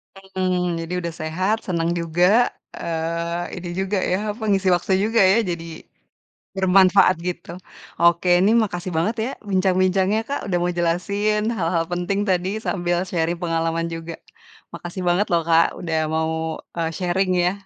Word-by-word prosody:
Mhm, 185 Hz, -2 st, -2 dB
jadi 165 Hz, +2 st, -6 dB
udah 170 Hz, -2 st, -4 dB
sehat, 185 Hz, +7 st, 0 dB
seneng 170 Hz, -2 st, 0 dB
juga, 180 Hz, +8 st, +3 dB, 0.2 s
eee, 170 Hz, +1 st, -3 dB
ini 175 Hz, 0 st, -6 dB
juga 195 Hz, +1 st, -1 dB
yah, 190 Hz, +3 st, +1 dB
apa, 220 Hz, -, -9 dB
ngisi 195 Hz, -1 st, +1 dB
waktu 185 Hz, +2 st, -1 dB
juga 225 Hz, 0 st, +2 dB
ya, 190 Hz, +5 st, +5 dB
jadi 170 Hz, -1 st, -3 dB, 0.9 s
bermanfaat 190 Hz, 0 st, +5 dB
gitu. 175 Hz, -1 st, -5 dB, 0.5 s
Oke, 170 Hz, +1 st, +3 dB
ini 200 Hz, +4 st, +4 dB
makasih 180 Hz, -2 st, -4 dB
banget 210 Hz, +9 st, 0 dB
ya 250 Hz, -, -2 dB, 0.2 s
bincang-bincangnya 190 Hz, +2 st, +2 dB
Kak, 285 Hz, -, -2 dB
udah 180 Hz, -2 st, 0 dB
mau 175 Hz, 0 st, 0 dB
jelasin 200 Hz, +5 st, 0 dB, 0.2 s
hal-hal 165 Hz, -1 st, 0 dB
penting 175 Hz, +3 st, -1 dB
tadi 185 Hz, 0 st, +1 dB, 0.2 s
sambil 175 Hz, -2 st, 0 dB
sharing 170 Hz, -1 st, -1 dB
pengalaman 165 Hz, 0 st, -1 dB
juga. 165 Hz, 0 st, -7 dB, 0.6 s
Makasih 175 Hz, +1 st, -6 dB
banget 180 Hz, +4 st, +2 dB
loh 170 Hz, -1 st, +3 dB
Kak, 165 Hz, 0 st, +5 dB
udah 165 Hz, -2 st, -3 dB, 0.2 s
mau, 160 Hz, 0 st, 0 dB, 0.4 s
eee, 165 Hz, -1 st, -1 dB
sharing 185 Hz, +1 st, 0 dB
ya. 180 Hz, -, +2 dB
180 Hz, 150 wpm, -22 LUFS, 170-190 Hz, 0.9 s, ya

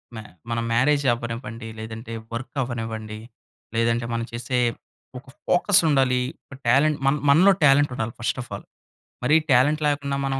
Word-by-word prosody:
మ -, -, -7 dB, 0.3 s
మనం 115 Hz, 0 st, -1 dB
మ్యారేజ్ 140 Hz, +4 st, +2 dB
అవ్వనివ్వండి. 115 Hz, -1 st, -6 dB
లేదంటే, 110 Hz, +1 st, -8 dB, 0.2 s
వర్క్ 130 Hz, +5 st, -6 dB
అవ్వనివ్వండి. 110 Hz, -3 st, -5 dB, 0.6 s
లేదంటే, 115 Hz, +1 st, +1 dB
మనం 115 Hz, 0 st, -2 dB
చేసే 120 Hz, +2 st, -2 dB, 0.6 s
ఒక 135 Hz, -, -22 dB, 0.2 s
ఫోకస్ 195 Hz, +2 st, +4 dB
ఉండాలి. 130 Hz, -3 st, +2 dB, 0.3 s
ఒక 140 Hz, -, -11 dB
టాలెంట్, 145 Hz, +5 st, +3 dB
మన్ 145 Hz, +2 st, +2 dB
మనలో 180 Hz, +7 st, +6 dB
టాలెంట్ 145 Hz, -1 st, +5 dB
ఉండాలి 110 Hz, -2 st, -3 dB
ఫస్ట్ 120 Hz, -, -1 dB
ఆఫ్ 120 Hz, -, -11 dB
ఆల్. -, -, -10 dB, 0.6 s
మరి 150 Hz, +5 st, +4 dB, 0.2 s
టాలెంట్ 145 Hz, +5 st, +3 dB
లేకుండా 140 Hz, -1 st, -1 dB
మనం 135 Hz, 0 st, -1 dB
125 Hz, 150 wpm, -23 LUFS, 115-145 Hz, 0.6 s, మనలో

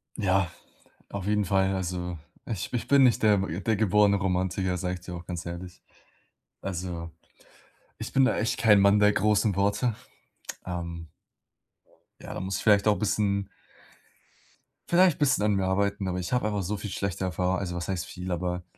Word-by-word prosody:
Ja, 95 Hz, -2 st, +1 dB, 0.6 s
auf 100 Hz, -2 st, -5 dB
jeden 105 Hz, -1 st, +1 dB
Fall, 95 Hz, +1 st, +2 dB
also 90 Hz, -1 st, -3 dB, 0.3 s
ich 105 Hz, -6 st, -4 dB
ich 120 Hz, -, -2 dB
bin 140 Hz, -1 st, +6 dB
nicht 125 Hz, -3 st, +4 dB
der 105 Hz, -2 st, +5 dB
der 95 Hz, +3 st, -1 dB
geborene 105 Hz, -1 st, +3 dB
Romantiker, 95 Hz, -1 st, -1 dB
sage 90 Hz, 0 st, -2 dB
ich -, -, -10 dB
dir 90 Hz, 0 st, -7 dB
auch 85 Hz, 0 st, -9 dB
ganz 90 Hz, -2 st, -5 dB
ehrlich. 85 Hz, +1 st, -8 dB, 0.8 s
Also, 85 Hz, -3 st, -5 dB, 0.9 s
ich -, -, -6 dB
bin 135 Hz, -, +5 dB
da -, -, +1 dB
echt 110 Hz, -, -1 dB
kein 105 Hz, -3 st, +6 dB
Mann 100 Hz, +1 st, +5 dB
der 105 Hz, 0 st, +5 dB
großen 105 Hz, -1 st, +2 dB
Worte. 105 Hz, +4 st, +1 dB, 0.7 s
Ähm 85 Hz, -2 st, -5 dB, 1.1 s
Ja, -, -, -7 dB
da -, -, -5 dB
muss 95 Hz, +1 st, -3 dB
ich -, -, -6 dB
vielleicht 105 Hz, -1 st, +4 dB
auch 105 Hz, -, +5 dB
'n -, -, -7 dB
bisschen 100 Hz, -1 st, 0 dB, 1.4 s
vielleicht 175 Hz, -2 st, +5 dB
'n -, -, -28 dB
bisschen 135 Hz, -7 st, +2 dB
an 105 Hz, -1 st, +2 dB
mir 95 Hz, -1 st, 0 dB
arbeiten, 100 Hz, +1 st, 0 dB
aber 90 Hz, 0 st, -2 dB
ich 90 Hz, -, -5 dB
habe 125 Hz, -3 st, +1 dB
einfach 105 Hz, -2 st, -1 dB
so 105 Hz, +4 st, -2 dB
viel 105 Hz, -, -6 dB
schlechte 95 Hz, -1 st, -3 dB
Erfahr 90 Hz, 0 st, 0 dB
also 90 Hz, -3 st, -4 dB
was 85 Hz, 0 st, -4 dB
heißt 90 Hz, -3 st, -2 dB
viel, 90 Hz, 0 st, -7 dB
aber 90 Hz, 0 st, -2 dB
95 Hz, 180 wpm, -27 LUFS, 90-105 Hz, 1.4 s, bin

